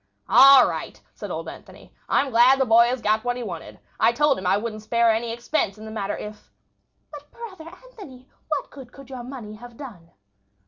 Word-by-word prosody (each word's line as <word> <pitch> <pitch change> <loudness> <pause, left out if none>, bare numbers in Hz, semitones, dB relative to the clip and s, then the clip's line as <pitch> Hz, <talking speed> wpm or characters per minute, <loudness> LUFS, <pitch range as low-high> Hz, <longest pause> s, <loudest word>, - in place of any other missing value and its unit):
"All 275 -1 +8
right," - - -6
said - - -9
old - - -5
Anthony. - - -13 0.2
"I'm 275 -1 +1
glad 245 +3 +5
the 265 - +2
boy 230 0 +5
has 250 0 -3
got 215 +1 +1
what 245 0 -2
he 245 - -5
wanted. 175 -7 -8 0.2
I 225 - +4
told 290 +1 +1
him 185 - -4
I 195 - +3
wouldn't 215 0 -5
spare 235 +1 +2
any 225 +1 -2
expense 235 -3 -2
in 215 - -11
the 220 - -8
matter 205 -2 -4
if—" 210 0 -10 0.6
"But, 295 -1 -12
brother 405 -9 -11
Anthony, 365 - -15 0.2
what 300 -3 -3
good 265 -3 -13
could 275 0 -15
your 255 -2 -7
money 240 -4 -9
have 240 +1 -13
done?" 205 - -11
245 Hz, 200 wpm, -23 LUFS, 220-275 Hz, 0.6 s, All